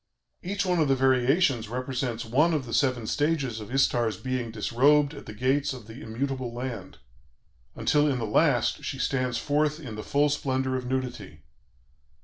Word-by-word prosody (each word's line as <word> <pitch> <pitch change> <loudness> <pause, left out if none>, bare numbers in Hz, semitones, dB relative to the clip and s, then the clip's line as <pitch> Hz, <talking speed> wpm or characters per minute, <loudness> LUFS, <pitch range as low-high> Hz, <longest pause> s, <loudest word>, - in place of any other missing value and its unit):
Each 200 +2 -2
one 180 -2 +1
of 155 - +3
the 135 - +3
variations 130 - +2
represents 125 -1 -3
one 150 +9 +3
of 140 -4 -2
the 115 - -7
seven 125 -5 +1
stages 145 -3 0
of 105 +2 -9
Istar's 120 -6 +2
being 130 -1 -3
disrobed 140 +7 +3
at - - -11
the 105 - -7
gates 135 +5 +1
of 125 -5 -10
the 115 +4 -11
'immutable 130 +2 -3
land,' 120 -6 -6 0.8
until 150 0 +2
in 135 -3 +1
the 115 - -2
last 105 - +2
she - - -4
stands 125 -3 0
forth 150 +3 0
in 130 -8 -8
the 110 - -5
full 145 +1 +2
splendor 130 -2 -1
of 125 -1 -3
nudity.... 115 - -4
130 Hz, 170 wpm, -27 LUFS, 115-145 Hz, 0.8 s, of